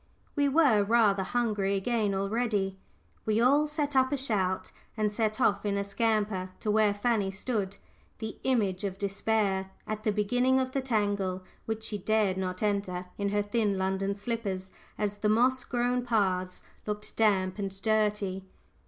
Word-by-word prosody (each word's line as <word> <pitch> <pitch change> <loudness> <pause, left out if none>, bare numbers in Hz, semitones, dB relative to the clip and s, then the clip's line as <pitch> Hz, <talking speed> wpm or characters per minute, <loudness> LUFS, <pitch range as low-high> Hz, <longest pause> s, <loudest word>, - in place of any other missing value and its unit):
We 285 -2 +3
were 270 -8 +4
rather 205 -2 +3
hungry 205 -2 0
again 210 0 0
already. 195 -1 -1 0.4
We 215 0 +1
all 280 +5 +4
set 295 -2 -2
up 260 0 +4
a 285 - +1
shout, 200 -8 -1 0.3
and 215 -1 +1
set 215 -1 0
off 200 0 +2
in 200 -1 0
a 200 - 0
scamper 205 -2 0
to 215 - 0
where 215 -1 +4
Fanny 205 -1 0
stood, 200 -1 -3 0.4
the 220 -1 -5
image 210 -8 +1
of 195 -2 -3
despair, 200 -1 0 0.2
at 215 0 -4
the 215 - +2
beginning 245 +6 +2
of 260 0 -1
the 275 - -1
tangle, 205 -6 0 0.2
which 220 0 -3
she 210 -2 -3
dared 210 -1 +1
not 185 +1 -3
enter 200 -3 -1
in 200 0 0
her 205 0 +1
thin 205 -1 0
London 190 +1 0
slippers, 200 -3 -3 0.3
as 205 -1 -2
the 210 - +1
moss 250 +4 +3
grown 245 0 0
paths 185 -6 0 0.2
looked 210 0 -4
damp 195 -3 +2
and 195 -1 -4
dirty. 210 -3 +1
210 Hz, 160 wpm, -29 LUFS, 195-230 Hz, 0.4 s, were